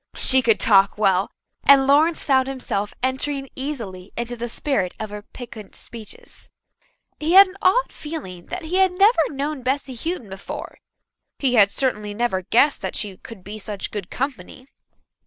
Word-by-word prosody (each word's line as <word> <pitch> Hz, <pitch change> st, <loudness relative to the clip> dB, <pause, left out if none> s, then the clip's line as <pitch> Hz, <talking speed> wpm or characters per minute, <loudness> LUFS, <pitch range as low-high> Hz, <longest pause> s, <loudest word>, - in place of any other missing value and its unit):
She 260 Hz, 0 st, +7 dB
could 230 Hz, -3 st, +2 dB
talk 195 Hz, -2 st, +4 dB
well, 195 Hz, -2 st, +2 dB, 0.3 s
and 275 Hz, -1 st, +6 dB
Lawrence 305 Hz, +4 st, +3 dB
found 265 Hz, -2 st, +3 dB
himself 210 Hz, -6 st, -3 dB
entering 270 Hz, +1 st, -2 dB
easily 225 Hz, -10 st, -6 dB
into 240 Hz, +1 st, -3 dB
the 240 Hz, 0 st, -5 dB
spirit 230 Hz, -8 st, -1 dB
of 215 Hz, -1 st, -5 dB
her 210 Hz, 0 st, -6 dB
piquant 220 Hz, -1 st, -11 dB
speeches. 235 Hz, -, -11 dB, 0.7 s
He 315 Hz, +3 st, 0 dB
had 390 Hz, +1 st, +10 dB
an 375 Hz, 0 st, -12 dB
odd 445 Hz, +7 st, +3 dB
feeling 235 Hz, -, -8 dB
that 360 Hz, -1 st, -6 dB
he 335 Hz, +4 st, -2 dB
had 380 Hz, -1 st, +4 dB
never 395 Hz, +2 st, +4 dB
known 285 Hz, 0 st, -4 dB
Bessy 265 Hz, +1 st, -2 dB
Houghton 255 Hz, -, -4 dB
before; 190 Hz, +1 st, -8 dB, 0.6 s
he 265 Hz, -3 st, +1 dB
had 205 Hz, -4 st, +5 dB
certainly 210 Hz, -5 st, -2 dB
never 225 Hz, -5 st, 0 dB
guessed 245 Hz, +10 st, +3 dB
that -, -, -4 dB
she 205 Hz, -3 st, -3 dB
could 220 Hz, -5 st, -12 dB
be 210 Hz, +3 st, -8 dB
such 205 Hz, -1 st, -5 dB
good 200 Hz, -4 st, -6 dB
company. 255 Hz, -2 st, -5 dB
250 Hz, 165 wpm, -22 LUFS, 205-290 Hz, 0.7 s, had